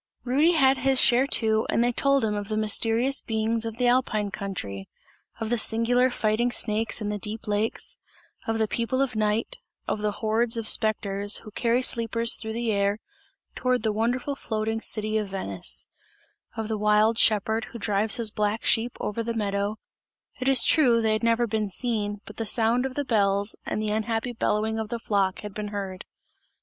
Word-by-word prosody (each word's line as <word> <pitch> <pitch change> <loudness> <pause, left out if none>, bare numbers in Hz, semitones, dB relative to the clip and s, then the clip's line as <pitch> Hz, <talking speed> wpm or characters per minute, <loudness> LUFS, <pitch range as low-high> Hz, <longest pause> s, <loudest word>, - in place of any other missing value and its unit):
Rudy 290 +7 +3
had 270 -4 +3
his 265 0 +3
share 255 +1 +5
too 220 -4 +1
and 235 - +2
they 240 - +2
told 275 0 +2
him 210 - -1
of 205 -1 -4
the 215 - -1
mysterious 225 +5 +2
beings 225 +1 -1
of 225 0 -5
the 250 0 +1
Alpine 230 -5 +1
country; 180 - -6 0.5
of 225 0 -3
the 240 - +1
singular 240 +3 +2
fighting 235 0 0
snakes 220 0 +2
in 205 - -2
the 210 0 -3
deep 215 +2 -6
lakes; 210 +2 -1 0.5
of 225 0 0
the 220 -1 +1
people 235 +4 -1
of 270 -3 0
night; 215 - -1 0.3
of 210 - -2
the 210 -1 -1
hordes 225 +2 +1
of 225 -1 -2
spectres, 205 -3 +1
who 215 - -10
carry 235 +3 +1
sleepers 230 -1 +2
through 220 -1 -5
the 230 0 -1
air, 200 0 +1 0.6
towards 255 -1 0
the 220 -2 0
wonderful 245 +6 -1
floating 220 -3 -3
city 215 -1 0
of 210 - -3
Venice; 95 - -3 0.7
of 220 -1 -3
the 220 -1 -3
wild 210 +2 +3
shepherd, 220 +1 +2
who 235 - -10
drives 210 0 +1
his 225 -3 -2
black 210 +1 -1
sheep 230 +2 +2
over 210 +2 -3
the 230 0 -3
meadow; 205 0 -2 0.6
it 255 +1 +1
is 260 -4 +5
true, 250 -7 +4
they 220 -1 +1
had 215 - -1
never 230 0 +2
been 215 -2 -2
seen, 205 -2 -2
but - - -11
the 225 - -3
sound 235 +4 +2
of 260 - -10
the 285 - -2
bells 200 -3 +1
and - - -2
the 215 0 -1
unhappy 225 +2 -2
bellowing 220 -1 -1
of 220 -1 -4
the 235 - -3
flock, 200 -4 -1
had 210 -2 -8
been 210 0 -5
heard. 195 -2 -6
220 Hz, 190 wpm, -25 LUFS, 210-235 Hz, 0.7 s, share